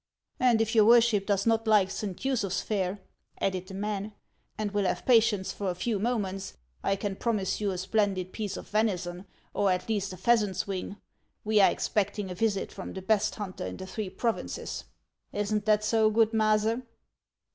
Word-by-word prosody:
" - - -47
And 225 -2 +3
if 225 +1 0
your 220 -2 +6
worship 230 -3 +5
does 200 -1 +1
not 225 0 +2
like 205 -3 +4
Saint 195 +2 -5
Usuph's 225 -9 0
1 - - -13
fare," 195 -2 -1 0.4
added 185 -1 -1
the 190 - -8
man, 210 +1 -3 0.2
" - - -44
and 210 -1 -2
will 205 -1 0
have 180 - -1
patience 225 -5 +4
for 200 -2 -3
a 180 - -2
few 215 +3 -1
moments, 195 -4 -2 0.3
1 195 - 0
can 195 0 -3
promise 210 -3 -1
you 205 - +1
a 185 - -2
splendid 190 -1 0
piece 210 -3 -4
of - - -9
venison, 190 -4 -1 0.3
or 200 -1 +2
at 180 0 -1
least 205 -3 -1
a 185 - -8
pheasant's 210 -5 +2
wing. 195 0 -4 0.5
We 215 -1 +4
are - - +7
expecting 205 -2 -1
a - - -2
visit 200 +1 -1
from 190 - -7
the 190 - -7
best 210 +1 +2
hunter 195 -3 -5
in - - -6
the 190 - -7
three 195 +1 -4
provinces. 230 +3 -3 0.5
Is 205 +1 -1
n't 210 -1 0
that 215 -1 +3
so, 220 0 +3
good 220 0 +3
Maase? 220 +1 +2
205 Hz, 200 wpm, -28 LUFS, 190-220 Hz, 0.5 s, are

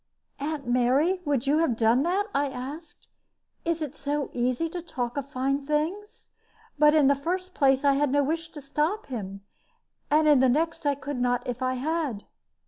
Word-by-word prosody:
"Aunt 290 -1 -3
Mary, 260 +10 +2
would 280 -3 0
you 290 +3 +3
have 270 -9 +1
done 230 +3 +3
that?" 365 +6 +1
I 285 +1 +1
asked. 280 +4 -8 0.6
"It 335 -1 0
is 300 0 -7
so 290 0 -2
easy 250 +6 0
to 345 +2 -6
talk 250 -8 -4
of 280 -1 -4
fine 275 +2 -1
things! 315 +9 -3 0.5
But 300 0 +6
in 300 -3 +5
the 280 - +6
first 365 +6 -3
place, 270 0 +3
I 280 - +5
had 285 0 +1
no 285 +1 +3
wish 325 +3 -2
to 295 -3 -9
stop 300 +9 -1
him; 200 -6 -6 0.7
and 305 +1 +4
in 295 -3 +6
the 260 0 +4
next, 320 +3 0
I 285 - +2
could 280 -1 -5
not 245 0 0
if 250 +1 -4
I 255 0 0
had." 285 -5 -2
285 Hz, 190 wpm, -26 LUFS, 255-315 Hz, 0.7 s, But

